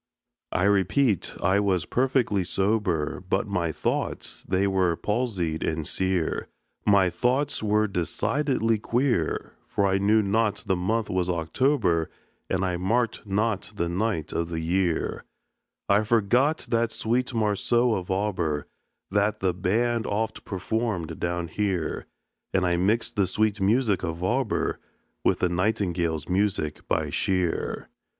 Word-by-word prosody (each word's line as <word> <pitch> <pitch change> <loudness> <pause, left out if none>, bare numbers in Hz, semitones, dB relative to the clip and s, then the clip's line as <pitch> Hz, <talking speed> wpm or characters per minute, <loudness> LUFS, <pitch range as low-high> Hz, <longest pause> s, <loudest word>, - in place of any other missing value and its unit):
I 90 - 0
repeat, 100 - +2
I 95 +3 +3
was 95 -5 +1
perfectly 125 -6 +1
sober, 95 -4 0
But - - +1
my 90 -6 -1
thoughts - - -3
they 95 +1 +2
were 95 -3 +2
palsied 105 -8 -1
and 80 -1 -1
sear, 95 -1 -1 0.4
My 100 -3 +5
thoughts 130 +8 0
were 105 0 +2
decidedly 115 - 0
queer; 120 - 0
For 100 - 0
I 95 0 +2
knew 105 +2 +4
not 105 +1 +1
the 95 - +1
month 105 +5 -1
was 90 -1 0
October, 90 - +1 0.4
And 95 0 0
I 90 -1 -1
marked 110 +5 0
not 105 0 -1
the 85 -4 -1
night 90 -3 -1
of 85 0 -1
the 85 -1 -3
year; 85 +1 0 0.6
I 100 +2 +4
forgot 120 +7 +2
that 115 -1 +1
sweet 120 +4 -1
morceau 115 +3 +2
of 90 -4 -3
Auber 90 -7 -1 0.5
That 105 +1 +1
the 95 -2 +1
band 115 +6 0
oft 110 +2 -2
performed 100 -2 -2
down 85 0 -2
here, 95 -1 -2 0.5
And 95 -1 +3
I 90 -1 +2
mixed 115 +6 +1
the 100 -2 +3
sweet 105 +1 0
music 105 0 +2
of 85 0 -4
Auber 120 +4 0 0.4
With - - +2
the 90 - +3
Nightingale's 90 -4 0
music 90 -5 -1
by - - 0
Shear. 90 -3 -1
100 Hz, 135 wpm, -26 LUFS, 90-110 Hz, 0.6 s, My